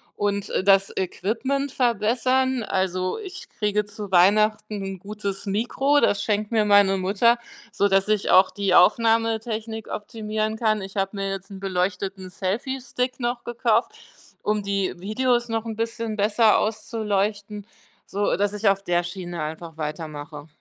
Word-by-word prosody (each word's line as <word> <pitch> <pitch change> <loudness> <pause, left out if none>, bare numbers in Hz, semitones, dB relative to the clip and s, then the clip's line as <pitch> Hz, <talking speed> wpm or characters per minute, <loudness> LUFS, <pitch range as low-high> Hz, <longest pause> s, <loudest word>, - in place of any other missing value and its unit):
und 200 -1 -2
das 195 0 +4
Equipment 240 +9 -2
verbessern. 250 +2 +1
Also, 185 -2 -1
ich 385 -3 -8
kriege 210 -1 0
zu 205 -1 -8
Weihnachten 215 +3 +3
'n 195 -1 -5
gutes 200 0 -5
Mikro, 250 +8 +2
das 205 - +2
schenkt 210 0 -1
mir 220 -2 +2
meine 200 -1 +5
Mutter, 210 +6 +2 0.3
sodass 195 -1 +2
ich 215 -1 +1
auch 185 +1 +6
die 200 -1 +1
Aufnahmetechnik 225 +1 +2
optimieren 215 0 -3
kann. 215 -2 +1
Ich 195 0 -9
habe 195 0 -1
mir 195 0 -2
jetzt 195 +1 -6
'n 195 - -9
beleuchteten 190 0 -2
Selfiestick 250 +7 -3
noch 240 0 -2
gekauft, 235 - +1 0.5
um 210 0 0
die 200 -1 -1
Videos 240 +4 0
noch 225 0 -2
'n 225 -1 -4
bisschen 230 0 -3
besser 210 +1 +4
auszuleuchten, 210 -1 -2 0.4
sodass 205 0 0
ich 210 0 +2
auf 195 0 0
der 175 -2 +1
Schiene 175 -1 -6
einfach 160 +1 -6
weitermache. 150 -1 -6
210 Hz, 140 wpm, -24 LUFS, 195-225 Hz, 0.5 s, auch